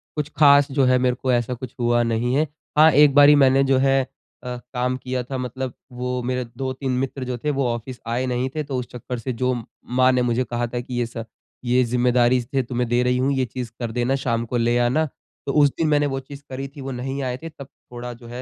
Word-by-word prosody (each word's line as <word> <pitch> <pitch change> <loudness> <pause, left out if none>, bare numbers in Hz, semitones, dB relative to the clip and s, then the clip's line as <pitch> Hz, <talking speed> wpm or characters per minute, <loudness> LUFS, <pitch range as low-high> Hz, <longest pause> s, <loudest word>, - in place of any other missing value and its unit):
कुछ 150 -1 -2
ख़ास 140 -2 +6
जो 135 -1 +2
है 130 0 +4
मेरे 125 -1 +1
को 130 0 -1
ऐसा 120 0 +1
कुछ 125 0 -8
हुआ 120 0 +2
नहीं 115 +1 0
है। 155 +3 +2 0.3
हाँ, 155 +1 +8
एक 145 0 +6
बारी 145 0 +8
मैंने 135 -1 +5
जो 135 -1 +3
है 135 0 +3 0.4
अ, 125 0 -5 0.2
काम 125 0 -1
किया 130 -1 -3
था 130 +2 -5
मतलब 125 0 -4 0.2
वो 125 0 -3
मेरे 125 0 -2
2-3 130 0 -3
मित्र 135 0 -3
जो 125 -1 -3
थे 150 - 0
वो 130 - +1
ऑफिस 120 +2 -7
आए 120 +3 -1
नहीं 125 +1 -1
थे 155 - -1
तो 140 -2 -4
उस 125 - -6
चक्कर 125 +1 -6
से 130 +2 -4
जो 125 +2 0 0.3
माँ 130 +1 +3
ने 125 -1 +2
मुझे 125 +1 +1
कहा 120 +1 -2
था 120 +1 -4
की 125 0 -6
ये 120 - +1
सब 115 -1 -7 0.4
ये 125 +1 +3
ज़िम्मेदारी 125 +1 +2
से 130 +3 -2
तुम्हें 120 0 -2
दे 120 +1 +2
रही 125 0 +1
हूँ 130 +2 +1
ये 130 -1 +1
चीज़ 125 -2 -6
कर 120 -2 -3
देना, 125 +3 0
शाम 120 -4 -1
को 120 +1 -2
ले 120 +1 +2
आना। 125 +6 +2 0.4
तो 140 - -2
उस 145 - +6
दिन 160 - +1
मैंने 145 -1 +3
वो 135 -1 -2
चीज़ 140 +1 -11
करी 135 +1 -5
थी 140 +1 -12
वो 135 - -5
नहीं 135 +2 -4
आए 125 -1 -2
थे, 165 +4 -8
तब 140 -3 -11 0.2
थोड़ा 120 0 -6
जो 120 0 -14
है 120 +2 -7
125 Hz, 250 wpm, -22 LUFS, 120-135 Hz, 0.4 s, हाँ